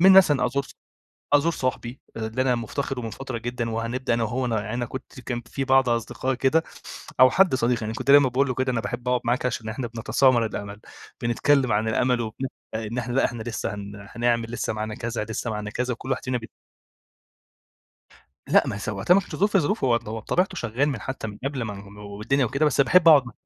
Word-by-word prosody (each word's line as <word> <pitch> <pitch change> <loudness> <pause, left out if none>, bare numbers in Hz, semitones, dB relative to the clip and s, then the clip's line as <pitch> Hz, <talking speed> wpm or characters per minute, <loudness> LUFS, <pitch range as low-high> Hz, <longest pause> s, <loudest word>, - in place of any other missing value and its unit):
منها 190 +2 +8
مثلًا 145 -9 +6
أزور 140 +3 -1
ص - - -14 0.6
أزور 145 +3 +4
صاحبي 130 -2 -3 0.2
اللي 115 +3 -2
أنا 125 -2 +2
مفتقِده 125 +2 -3
من 115 - -4
فترة 130 +2 -5
جدًا، 120 0 -3
وهنبدأ 115 +2 -1
أنا 115 - 0
وهو 125 +3 -1
ن 120 - -2
أنا 110 +3 -2
كنت 130 +1 -9
كان 120 -1 -4
في 135 +2 -3
بعض 130 -1 +4
أصدقاء 120 +3 -1
كده، 135 +6 +2 0.6
أو 130 -1 +9
حد 190 0 +4
صديق 120 -2 +1
يعني 110 +1 -3
كنت 135 - -1
دايمًا 140 -2 +7
باقول 135 +2 +1
له 125 - -1
كده، 130 +1 0
أنا 115 - 0
باحب 120 +4 -4
أقعُد 125 -1 +2
معاك 125 +2 +1
عشان 115 -3 -3
إحنا 115 +3 -3
بنتسامر 120 +1 +2
الأمل، 100 -1 -6 0.4
بنتكلّم 125 +1 +2
عن 110 +2 +1
الأمل 125 +2 +1
وبن 115 +4 -4 0.3
إن 110 +2 -3
إحنا 120 0 -3
لأ، 135 - +3
إحنا 120 -2 -2
لسه 115 -3 -3
هن 100 0 -8
هنعمل 115 -1 +1
لسه 120 - -2
معانا 110 0 -4
كذا، 115 0 -3
لسه 110 +1 -4
معانا 105 -1 -4
كذا، 125 +2 -2
وكل 130 +3 -7
واحد 130 - -1
فين 125 -1 -1
بي 115 - -11 2.0
لأ - - +6
ما - - -2
هي - - -5
س - - -5
وقتها 105 - +3
ما 195 - +5
كانش - - -8
ظروف 205 +1 +2
ظروفه 170 0 +1
هو 120 -2 +4
بطبيعته 175 - -2
شغّال 120 +4 0
من 135 -7 -3
حتى 135 -1 -5
من 105 - -9
قبل 135 -3 -2
ما 105 -2 -4
ن 100 +1 -12
والدنيا 105 +7 -1
وكده، 140 +6 0
بس 145 - +2
باحب 165 +5 +5
أقعُد 145 -5 +8
مع 120 - -8
120 Hz, 215 wpm, -25 LUFS, 110-135 Hz, 2.0 s, أو